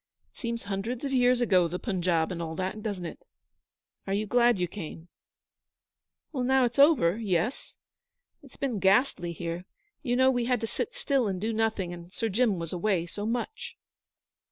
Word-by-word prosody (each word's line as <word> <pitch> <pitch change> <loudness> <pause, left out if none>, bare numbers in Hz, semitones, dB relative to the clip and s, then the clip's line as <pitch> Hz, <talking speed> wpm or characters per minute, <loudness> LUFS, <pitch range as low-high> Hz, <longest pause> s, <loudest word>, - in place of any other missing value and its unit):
'It - - -20
seems 235 -3 -3
hundreds 205 +7 -3
of 275 - -2
years 250 -1 +4
ago 185 -7 +4
the 175 +2 -4
Punjab 180 -6 0
and 170 -2 -4
all 160 -1 -4
that 190 +4 -3
doesn't 200 -5 -4
it? - - -7 0.9
Are 195 - 0
you 210 +1 0
glad 240 +1 +4
you 180 -1 0
came?' 165 -2 -8 1.2
'Now 260 -1 +3
it's 240 +3 -2
all 280 - +10
over, 220 - +2
yes. 195 +2 -1 0.7
It 280 - -15
has - - -20
been 255 -7 -1
ghastly 190 -2 +3
here. 170 +1 -5 0.4
You 245 -5 0
know 260 +1 +5
we 245 -2 0
had 250 0 +1
to - - 0
sit 355 - -4
still 270 -5 +1
and 190 -2 -2
do 220 +4 -1
nothing, 215 -5 0
and 175 0 -10
Sir 225 +3 -2
Jim 215 -1 +2
was 165 0 -5
away 180 -1 +1
so 205 +4 -5
much.' 245 - -4
210 Hz, 185 wpm, -28 LUFS, 180-245 Hz, 1.2 s, all